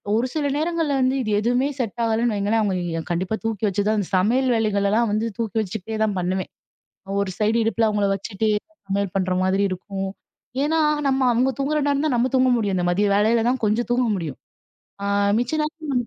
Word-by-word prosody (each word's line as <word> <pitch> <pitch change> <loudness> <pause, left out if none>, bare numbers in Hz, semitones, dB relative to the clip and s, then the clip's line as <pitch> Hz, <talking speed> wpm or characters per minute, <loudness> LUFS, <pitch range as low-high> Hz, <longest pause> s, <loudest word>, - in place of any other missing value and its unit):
ஒரு 240 +3 +1
சில 300 -2 0
நேரங்கள்ல 325 -2 0
வந்து 260 +1 +2
இது 215 -3 -2
எதுவுமே 245 +5 +1
செட் 235 -1 -3
ஆகலன்னு 225 0 +1
வைங்களேன், 210 +3 +1
அவங்களை 175 -5 -1
கண்டிப்பா 185 +5 -1
தூக்கி 220 -2 -2
வெச்சு 200 +1 0
தான் 215 -2 +1
சமையல் 245 +8 +2
வேலைகள் 205 -3 +1
எல்லாம் 225 +1 +2
வந்து 220 +2 0
தூக்கி 225 -3 -3
வெச்சுக்கிட்டே 220 +1 -4
தா - - +2
பண்ணுவேன். 185 +1 -2 0.7
ஒரு 195 -2 -1
சைடு 220 +2 +2
இடுப்புல 225 0 +2
அவங்களை 205 -1 +1
வெச்சுட்டு, 200 +2 -2 0.4
சமையல் 195 -1 -2
பண்ற 185 -1 +1
மாதிரி 190 +1 +2
இருக்கும். 195 +1 -4 0.5
ஏன்னா 320 +1 +1 0.3
நம்ம 265 0 +1
அவங்க 255 +3 +2
தூங்குற 300 +2 +1
நேரம் 285 +1 +1
தான் 270 - +1
நம்ம 245 +2 +1
தூங்க 255 0 +4
முடியும் 200 -4 0
இந்த 175 - 0
மதிய 205 +3 +2
வேலைலதா 230 +3 +3
கொஞ்சம் 220 +4 +1
தூங்க 245 0 +2
முடியும். 160 -7 -5 0.6
ஆ - - -2 0.3
மிச்ச 245 +4 -2
நேரம் 300 -6 -2
220 Hz, 185 wpm, -23 LUFS, 200-245 Hz, 0.7 s, தூங்க